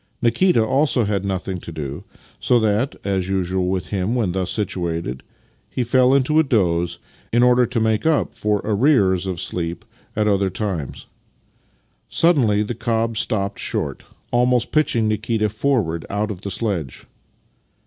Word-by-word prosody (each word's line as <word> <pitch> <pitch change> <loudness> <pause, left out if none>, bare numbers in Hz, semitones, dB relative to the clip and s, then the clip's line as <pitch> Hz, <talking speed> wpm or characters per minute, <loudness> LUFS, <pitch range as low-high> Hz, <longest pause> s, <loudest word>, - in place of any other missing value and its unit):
Kikita 120 +1 +3
also 135 0 +2
had 100 -2 -1
nothing 95 -1 -3
to 85 - -9
do, 75 -3 -6 0.4
so 125 - +3
that, 110 +5 +1
as 95 -2 -1
usual 95 -1 0
with 90 -4 -2
him 100 +4 -1
when 110 -7 0
thus 95 0 -2
situated, 85 - -2 0.5
he 125 - -2
fell 130 +2 +4
into 140 +3 +3
a - - +5
doze, 85 - +1 0.3
in 120 +1 +3
order 125 0 +4
to 120 0 -1
make 110 -1 +1
up 160 -2 +1
for 105 -1 0
arrears 100 - +2
of 90 -3 -3
sleep 85 -1 -4 0.3
at 105 0 +1
other 100 -2 +2
times. 95 - -4 1.0
Suddenly 125 -12 +3
the 105 - -3
cob 115 0 -1
stopped 100 -2 -1
short, - - -3 0.3
almost 125 0 +2
pitching 120 -8 +2
Nikita 110 0 0
forward 105 -8 -1
out 105 +2 -1
of 95 -3 -7
the 100 - -5
sledge. 95 - -3
105 Hz, 150 wpm, -21 LUFS, 95-120 Hz, 1.0 s, a